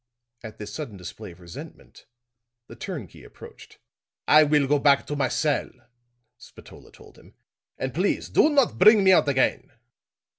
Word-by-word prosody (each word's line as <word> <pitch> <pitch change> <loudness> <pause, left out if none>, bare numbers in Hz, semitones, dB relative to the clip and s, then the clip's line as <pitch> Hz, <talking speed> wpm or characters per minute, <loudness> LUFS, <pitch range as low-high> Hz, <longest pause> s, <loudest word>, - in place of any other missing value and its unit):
At 110 -2 -11
this 105 -1 -9
sudden 130 -10 -7
display 90 -1 -10
of 85 - -18
resentment, 85 -1 -13 0.6
the - - -13
turnkey 150 - -8
approached. - - -15 0.5
"I 155 +1 +6
will 150 -1 +2
go 145 +1 +1
back 140 0 +3
to 145 - -5
my 140 -2 0
cell," 150 -3 -1 0.7
Spatola - - -16
told - - -18
him, - - -21 0.4
"and 130 -1 -5
please 185 +4 -1
do 305 - +3
not 280 -4 +1
bring 215 -2 +6
me 190 - +5
out 180 - +3
again. 130 -2 0
145 Hz, 155 wpm, -24 LUFS, 120-175 Hz, 0.7 s, I